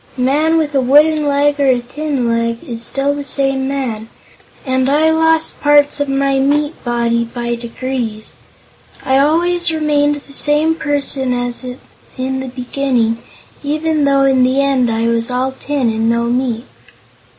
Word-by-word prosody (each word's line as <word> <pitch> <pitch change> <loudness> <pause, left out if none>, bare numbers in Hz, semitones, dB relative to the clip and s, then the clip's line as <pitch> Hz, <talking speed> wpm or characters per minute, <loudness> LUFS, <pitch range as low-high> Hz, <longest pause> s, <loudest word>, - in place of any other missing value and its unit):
A - - -3
man 305 +5 +2
with 305 -2 -1
a 270 - +2
wooden 300 +3 +4
leg 285 +1 +1
or 280 - +2
a 255 -2 +3
tin 265 +1 -3
leg 230 0 -1
is 235 -1 -5
still 275 +3 -1
the 285 0 -5
same 270 -1 0
man; 240 -5 -4 0.6
and, 260 0 0
as 280 - +2
I 315 +1 +3
lost 320 0 +1
parts 290 -1 +3
of 285 -1 -1
my 275 0 +1
meat 295 +3 0
body 235 -1 0
by 240 0 -4
degrees, 235 -2 -5 0.7
I 265 0 +3
always 345 +4 +2
remained 295 -2 +1
the 285 -1 -12
same 295 +3 +3
person 280 -4 0
as 245 0 -1 0.5
in 265 +1 -2
the 265 - -5
beginning, 245 -2 -1 0.4
even 305 +1 0
though 275 -1 +3
in 265 -1 +3
the 260 +2 +2
end 270 -3 +2
I 225 0 -1
was 230 0 0
all 255 +1 -1
tin 265 -2 -2
and 225 +1 0
no 235 0 +1
meat." 240 0 -1
270 Hz, 165 wpm, -16 LUFS, 245-290 Hz, 0.7 s, wooden